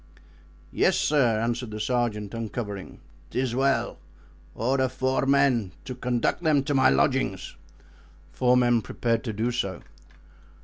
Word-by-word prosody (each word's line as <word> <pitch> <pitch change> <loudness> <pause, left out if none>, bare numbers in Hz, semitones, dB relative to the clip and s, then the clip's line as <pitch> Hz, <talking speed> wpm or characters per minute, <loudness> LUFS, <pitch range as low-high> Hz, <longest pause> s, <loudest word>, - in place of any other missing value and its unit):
"Yes, - - +2
sir," 125 -7 +2
answered 120 +1 -2
the 110 0 -6
sergeant, 110 -4 -1
uncovering. 105 -3 -5 0.3
"'Tis 125 -2 -1
well; 130 -2 0 0.6
order 130 +2 +1
four 130 +1 -1
men 135 -9 +2
to - - -5
conduct 125 +3 -1
them 155 -5 +2
to 145 +1 -1
my 130 -1 +5
lodging." 130 -9 +2 0.9
Four 125 +10 +3
men 120 -2 +3
prepared 115 +3 -1
to 110 - -3
do 115 +4 -1
so. 100 -7 -3
120 Hz, 130 wpm, -26 LUFS, 110-130 Hz, 0.9 s, my